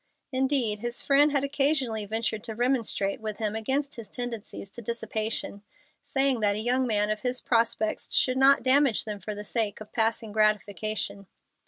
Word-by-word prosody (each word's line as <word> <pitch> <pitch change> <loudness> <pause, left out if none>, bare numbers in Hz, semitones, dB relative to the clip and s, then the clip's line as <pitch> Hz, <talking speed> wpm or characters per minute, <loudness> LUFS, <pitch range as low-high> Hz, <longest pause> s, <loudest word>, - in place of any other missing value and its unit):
Indeed, 260 -5 +2
his 240 +2 -3
friend 290 +1 +4
had 280 -1 +1
occasionally 275 -6 +1
ventured 220 0 -2
to 220 - -5
remonstrate 235 -5 0
with 215 -1 -4
him 215 -1 -2
against 270 +6 -1
his 225 -4 -9
tendencies 230 -5 -6
to 240 - -8
dissipation, 220 -2 -3 0.4
saying 275 -3 +2
that 205 -2 +2
a - - -2
young 250 +3 +1
man 210 -2 +1
of 215 - -2
his 250 +2 -2
prospects 230 -2 0
should 255 0 +2
not 275 +1 +5
damage 265 -3 +4
them 210 -2 -4
for 210 +2 -6
the 210 0 -7
sake 215 -2 -1
of 215 0 -12
passing 225 -1 0
gratification. 210 -1 0
225 Hz, 170 wpm, -27 LUFS, 215-260 Hz, 0.4 s, not